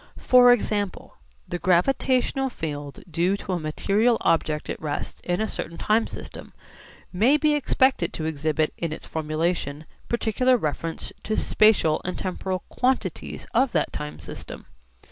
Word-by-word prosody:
For 250 -1 +6
example 205 -4 -1 0.3
the 175 - -4
gravitational 255 +8 +2
field 145 - -6
due 175 +4 +1
to 195 - -6
a 175 - 0
material 200 +9 +1
object 155 -2 +1
at - - -5
rest 150 -2 -4
in 175 0 -1
a 220 - 0
certain 170 -4 -5
time 220 +2 +2
system - - -9 0.6
may 235 +11 +4
be 300 0 +2
expected 260 -8 +2
to 155 - -4
exhibit 155 0 0
in 165 -2 -2
its 155 - -7
formulation 155 -1 -2 0.2
particular 245 +2 +2
reference 160 -2 -4
to 215 - -2
spatial 210 -8 +3
and 180 - -3
temporal 185 0 -3
quantities 255 +1 -1
of 245 +1 +2
that - - 0
time 150 0 -5
system. - - -9
185 Hz, 145 wpm, -25 LUFS, 160-240 Hz, 0.6 s, For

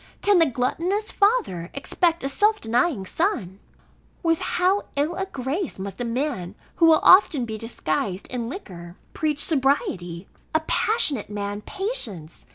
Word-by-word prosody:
Can 405 -3 +5
the 330 - +5
gluttonous 335 - -1
father 400 - +1
expect 335 +4 0
a - - 0
self 420 +10 +2
denying 235 - 0
son? 200 - -1 0.6
With 330 -1 +2
how 375 +3 +1
ill 290 +4 0
a 385 +2 -3
grace 285 +4 -3
must 195 +2 -6
a - - 0
man 235 -6 -3 0.2
who 330 - +5
will 320 -1 +6
often 350 -9 +6
be 220 -1 -6
disguised 195 -3 -3
in 235 -2 -3
liquor, 175 - -9 0.2
preach 300 -2 -1
sobriety? 235 - +1 0.3
a 315 - +3
passionate 315 - +1
man, 205 0 -4
patience? 220 - -4
275 Hz, 145 wpm, -24 LUFS, -, 0.6 s, will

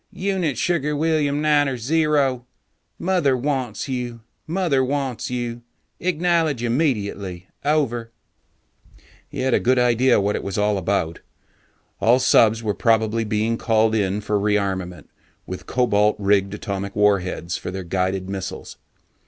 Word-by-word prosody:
"Unit 185 -7 -1
Sugar 150 -4 0
William 150 -1 +1
Niner 145 -3 +2
Zero, 140 -2 +1 0.5
Mother 170 -8 +1
wants 130 -4 -2
you, 125 -3 -4 0.3
Mother 165 -6 +1
wants 135 -2 -2
you. 120 -1 -4 0.4
Acknowledge 165 -6 +1
immediately. 100 - -1 0.2
Over." 135 -6 0 1.2
He 140 - -5
had 130 -1 +1
a - - +4
good 130 +1 +2
idea 125 0 +3
what 100 +1 0
it - - -2
was 100 -1 -4
all 105 -1 +1
about. 85 -3 -1 0.8
All 120 +3 +4
subs 115 -3 +4
were 105 -2 0
probably 115 0 +1
being 110 +2 0
called 110 -1 +2
in 100 -1 0
for 105 0 0
rearmament 100 -3 -1 0.4
with 95 - -7
cobalt 105 -4 +2
rigged 100 -1 +1
atomic 100 -2 -5
warheads 95 -4 +1
for - - -6
their 95 +1 -5
guided 95 +1 -1
missiles. 95 -1 -6
115 Hz, 130 wpm, -22 LUFS, 100-140 Hz, 1.2 s, a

